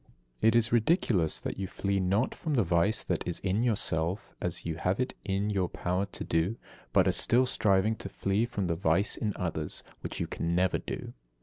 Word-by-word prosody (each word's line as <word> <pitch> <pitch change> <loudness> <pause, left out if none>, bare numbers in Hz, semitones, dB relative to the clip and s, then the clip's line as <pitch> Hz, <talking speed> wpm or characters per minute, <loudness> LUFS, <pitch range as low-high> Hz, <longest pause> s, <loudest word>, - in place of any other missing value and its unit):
71. - - +4
It 115 - +5
is 115 -1 +3
ridiculous 115 - +2
that - - -5
you 95 - -2
flee 100 +2 -1
not 100 +6 +1
from 155 -3 -2
the 115 - +4
vice 85 +4 +2
that - - -1
is 90 - 0
in 95 +3 +1
yourself, 100 -5 0
as - - -3
you 80 -1 -2
have 90 +5 0
it 125 - -1
in 100 +1 -1
your 95 -3 0
power 90 +3 -1
to - - -7
do; 85 +7 0 0.3
but - - +4
are - - +5
still 125 +2 +3
striving 105 -3 +2
to 100 - -6
flee 100 +4 0
from 105 -5 -2
the 85 -1 0
vice 85 +4 +1
in 105 - -1
others, 80 -4 -2 0.2
which - - -5
you - - 0
can 85 +1 -2
never 90 +1 +2
do. - - -6
100 Hz, 210 wpm, -29 LUFS, 90-110 Hz, 0.3 s, It